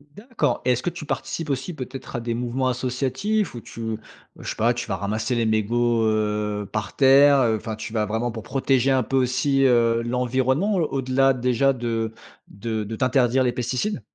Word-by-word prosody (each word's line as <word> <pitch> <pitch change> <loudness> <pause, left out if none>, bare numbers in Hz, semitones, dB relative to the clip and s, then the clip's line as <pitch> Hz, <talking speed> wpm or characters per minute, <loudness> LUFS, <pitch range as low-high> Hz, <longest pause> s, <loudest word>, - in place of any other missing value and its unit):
D'accord 235 +3 -2
et 125 - +2
est-ce 125 - 0
que - - 0
tu 175 -3 -8
participes 150 +2 -4
aussi, 135 +6 -2
peut-être, 130 -2 -7
à 120 - -2
des 115 0 -2
mouvements 125 +2 -1
associatifs, 130 - -1
où 120 - -6
tu 115 -1 -5 0.4
je - - -9
sais - - -3
pas, 115 +2 +2
tu 120 -1 -5
vas - - -1
ramasser 110 +4 -2
les 115 -1 +1
mégots, 115 +2 +1
heu, 105 -1 0
par 110 -1 -4
terre? 140 +1 +6
Heu, 115 -3 +2
enfin, 110 +1 -5
tu 110 - -7
vas 110 -1 0
vraiment 110 +3 -2
pour 110 -1 -7
protéger 135 -1 +1
un 130 -1 +3
peu 135 +4 -1
aussi, 135 +2 +2
heu, 115 -2 +3
l'environnement? 130 - 0
Au-delà, 135 -5 +2
déjà, 125 +2 +2
de 115 -3 -2 0.3
de 110 0 -4
de 110 +2 -5
t'interdire 130 +1 +2
les 125 - +2
pesticides? 130 - -2
125 Hz, 190 wpm, -23 LUFS, 115-135 Hz, 0.4 s, terre